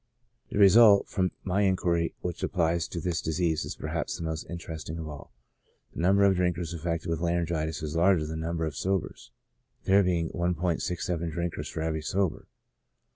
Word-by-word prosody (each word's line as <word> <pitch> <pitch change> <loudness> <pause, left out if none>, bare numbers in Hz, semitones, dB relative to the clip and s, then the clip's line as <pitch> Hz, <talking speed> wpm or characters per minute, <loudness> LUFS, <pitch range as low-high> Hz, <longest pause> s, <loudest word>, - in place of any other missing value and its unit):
The - - -4
result, 105 +1 +7
from 95 -1 +1
my 95 +1 0
inquiry, 90 -4 +1
which 90 -2 -4
applies 85 -1 0
to 85 - -5
this 85 0 -1
disease 80 0 0
is - - -5
perhaps - - -3
the - - -6
most 80 -1 -4
interesting 80 -2 -6
of 80 -1 -5
all. 75 -2 -9 0.6
The - - -8
number 100 +3 +4
of 95 -2 +4
drinkers 90 -2 -1
affected 85 +1 -3
with 80 -1 -1
laryngitis 85 -3 -1
is 75 +1 -4
larger 85 -1 +3
than 80 +1 -5
the 80 - -3
number 85 -1 -1
of 80 - -4
sobers: 95 -2 -2 0.5
there 100 +1 +5
being 85 -3 0
1 85 -1 -1
67 85 -1 -2
drinkers 85 +1 -4
for 80 - -5
every 80 -1 -1
sober. 95 +2 -1
85 Hz, 180 wpm, -28 LUFS, 80-90 Hz, 0.6 s, result